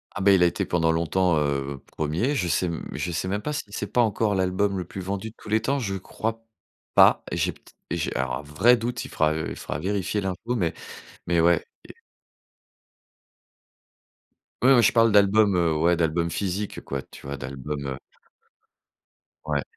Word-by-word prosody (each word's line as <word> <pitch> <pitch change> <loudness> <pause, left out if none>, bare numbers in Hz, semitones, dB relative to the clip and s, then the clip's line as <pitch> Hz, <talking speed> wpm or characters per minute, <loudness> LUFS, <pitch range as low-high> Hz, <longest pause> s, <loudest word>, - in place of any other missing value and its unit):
Ah 95 - -3
bah 100 +1 +5
il 95 -2 +5
a 90 - +6
été 85 - -1
pendant 80 -2 +1
longtemps, 85 +1 +1
heu, 70 -2 -1 0.2
1er. 80 - 0
Je 90 -9 0
sais, 85 +3 +1
mmh, 85 -1 -5
je 90 - -3
sais 85 +2 -2
même 100 +2 -2
pas 150 - -2
si 145 - -3
c'est 105 0 -4
pas 120 - +3
encore 110 -1 +1
l'album 95 +1 0
le 90 - -3
plus 95 +3 -7
vendu 100 +4 -4
de 110 - -19
tous - - -12
les 110 +1 +2
temps? 135 +5 0
Je 100 -6 -2
crois 110 +4 -4 0.5
pas - - +6
et - - -2
j'ai - - +1
peut-ê - - -20 0.2
et 85 - 0
j'ai - - -2
alors - - -1
un - - -7
vrai 75 +12 +4
doute, 120 +1 -3
il - - -9
fera 80 0 +1
il 80 - -3
fera - - -5
vérifier 100 +3 -1
l'info. 95 +6 -3
Mais 85 -8 0 0.5
mais 85 0 +1
ouais 85 0 +3 0.3
et - - -9 2.7
Ouais 130 +2 +6
moi 120 - +6
je 115 - +5
parle 115 -2 +4
d'albums, 100 0 +5
heu, 85 -2 +2
ouais, 85 +3 +3
d'albums 85 0 0
physiques 95 +4 -3
quoi, 70 -1 -4
tu - - -15
vois 70 +1 -5
d'albums, 70 +2 -5
heu 65 - -6 1.5
ouais. 75 -2 0
90 Hz, 195 wpm, -25 LUFS, 80-105 Hz, 2.7 s, a